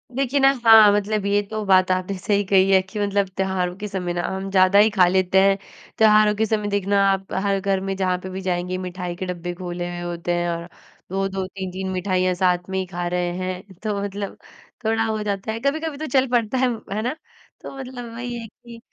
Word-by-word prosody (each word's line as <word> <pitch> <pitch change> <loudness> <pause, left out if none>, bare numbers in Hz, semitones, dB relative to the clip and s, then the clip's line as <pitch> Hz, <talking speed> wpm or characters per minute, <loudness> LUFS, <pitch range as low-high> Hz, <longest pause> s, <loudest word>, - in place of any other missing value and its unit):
देखिए 275 +1 +1
ना, 270 0 +6
हाँ, 220 -2 +9
मतलब 205 0 0
ये 200 +1 +2
तो 215 -1 -3
बात 185 -1 +4
आपने 185 +1 -1
सही 205 +2 0
कही 195 0 +5
है 190 -1 +6
कि 185 +3 -8
मतलब 200 -1 +1
त्योहारों 190 -2 -1
के 210 +1 -5
समय 180 -3 -3
ना 175 - -1
हम 190 0 -4
ज़्यादा 190 +1 +5
ही 215 +1 +6
खा 190 -4 +4
लेते 185 +1 +3
हैं। 195 0 +4 0.4
त्योहारों 215 -1 +5
के 220 +1 +1
समय 215 -1 -1
देखना 200 0 +1
आप 195 0 -2
हर 200 -1 +1
घर 195 0 0
में 195 0 -3
जहाँ 185 -1 0
पे 185 - -6
भी 190 +1 -6
जाएँगे, 180 0 -2
मिठाई 180 -1 -5
के 185 - -5
डिब्बे 175 -1 -4
खोले 175 -1 -5
हुए 175 0 -6
होते 170 0 -3
हैं, 175 0 0
और 170 0 -4 0.4
2-2 195 0 -2
3-3 190 0 -5
मिठाइयाँ 185 0 0
साथ 180 0 +1
में 190 0 -1
ही 190 - -2
खा 175 -1 -4
रहे 175 0 -1
हैं, 185 +1 -5
तो 210 -2 -1
मतलब 200 0 -5 0.5
थोड़ा 225 0 +2
हो 220 -1 -2
जाता 200 +1 -3
है 225 - -4
कभी-कभी 295 +3 -2
तो 310 - -4
चल 260 - +1
पड़ता 240 0 +1
है, 260 0 +3 0.3
है 215 - -1
ना? 250 +6 -2 0.5
तो - - -8
मतलब 250 -3 -8
वही 240 +1 -5
है 225 - -8
कि 235 +2 -14
195 Hz, 220 wpm, -22 LUFS, 185-215 Hz, 0.5 s, हाँ